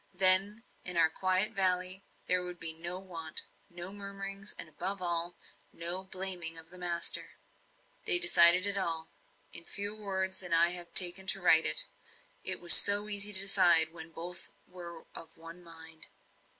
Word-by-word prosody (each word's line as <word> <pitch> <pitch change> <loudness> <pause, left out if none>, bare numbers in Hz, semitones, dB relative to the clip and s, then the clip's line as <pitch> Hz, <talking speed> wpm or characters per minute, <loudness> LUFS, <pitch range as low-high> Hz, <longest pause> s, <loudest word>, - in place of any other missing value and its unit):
Then 195 +3 +4 0.2
in 180 -2 -5
our 160 -1 +1
quiet 185 +4 -2
valley 185 0 -3 0.2
there 180 0 -2
would 180 -1 -10
be 165 -1 0
no 170 +3 -8
want, 165 -4 -10 0.3
no 175 +2 -12
murmurings, 195 0 -8
and, - - -7
above 185 +6 -7
all, 175 -1 -3 0.4
no 175 +3 -6
blaming 185 -3 -4
of 160 +1 -13
the 180 - -14
master. 175 -1 -4 0.7
They - - +2
decided 180 - +7
it 200 0 -2
all 165 -3 -5 0.4
in 170 - -9
fewer 205 +4 -6
words 190 -2 -7
than 180 -3 -6
I 170 +1 +1
have 175 -1 -8
taken 185 +1 +5
to 195 - 0
write 160 -3 +2
it - - +1 0.6
it - - -2
was 175 -1 +9
so 205 +1 +6
easy 205 0 -1
to 190 -2 +4
decide 175 -5 +2
when 160 -1 -14
both 175 +2 -11
were 170 -2 -15
of 165 0 -13
one 165 +2 -16
mind. 160 -1 -16
180 Hz, 165 wpm, -26 LUFS, 170-195 Hz, 0.7 s, was